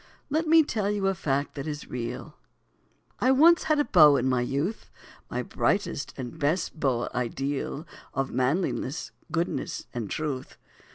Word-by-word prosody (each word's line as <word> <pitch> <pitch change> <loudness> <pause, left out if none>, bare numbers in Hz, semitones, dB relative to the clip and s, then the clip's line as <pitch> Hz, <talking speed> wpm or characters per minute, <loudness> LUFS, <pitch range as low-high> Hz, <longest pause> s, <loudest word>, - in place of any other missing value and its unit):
Let 315 +2 +1
me 325 0 +7
tell 215 -8 -1
you 205 -1 -1
a 195 - +3
fact 140 -5 -1
that 140 +1 -5
is 150 -1 -5
real 120 -2 -5 0.8
I 255 - +3
once 320 +6 +6
had 310 - +3
a 290 - +2
beau 150 -5 +7
in 130 0 0
my 130 -1 +2
youth, 140 - -2 0.4
My - - -2
brightest 200 -7 -1
and 130 +4 -6
best 160 +2 0
"beau 125 -5 +1
ideal" 135 +4 -2 0.3
Of 135 -1 -2
manliness, 135 +2 -1 0.2
goodness, 170 +1 -2
and 115 -5 -4
truth. 150 -5 -4
150 Hz, 155 wpm, -27 LUFS, 130-200 Hz, 0.8 s, me